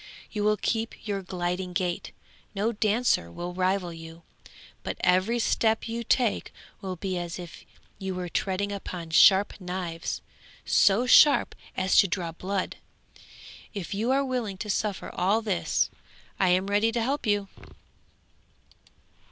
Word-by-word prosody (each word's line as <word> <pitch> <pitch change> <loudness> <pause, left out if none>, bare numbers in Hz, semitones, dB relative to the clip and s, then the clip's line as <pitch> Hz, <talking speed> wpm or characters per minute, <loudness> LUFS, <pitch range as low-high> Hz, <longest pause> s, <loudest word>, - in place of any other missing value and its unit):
You 210 -2 -2
will 210 0 +3
keep 225 0 -3
your 200 -1 -1
gliding 180 0 -3
gait, 175 -1 -2 0.4
no 210 +4 +1
dancer 215 - +1
will 175 - -5
rival 185 -1 0
you, 165 0 -11 0.6
but - - -4
every 185 +6 +3
step 225 -1 +1
you 230 +1 -3
take 235 -1 +1 0.3
will 190 -2 -4
be 185 +1 -3
as 175 -1 -5
if 175 -2 -10 0.4
you 190 -2 -3
were 180 -1 -3
treading 195 +3 -1
upon 180 -4 -6
sharp 195 +4 +6
knives, 180 -2 -4 0.4
so 205 +5 +4
sharp 285 +3 +6 0.2
as 185 - +1
to 195 - +7
draw 170 -2 -2
blood. 185 +3 -3 1.0
If 200 -1 -4
you 220 +5 -1
are 275 +1 +2
willing 240 -7 -2
to 210 +2 -3
suffer 205 -1 -2
all 205 +5 +1
this 200 -5 0 0.5
I 190 - +4
am 185 +2 +3
ready 205 +3 +2
to 235 - 0
help 270 0 -1
you!' 205 -1 +1
195 Hz, 145 wpm, -27 LUFS, 180-215 Hz, 1.0 s, to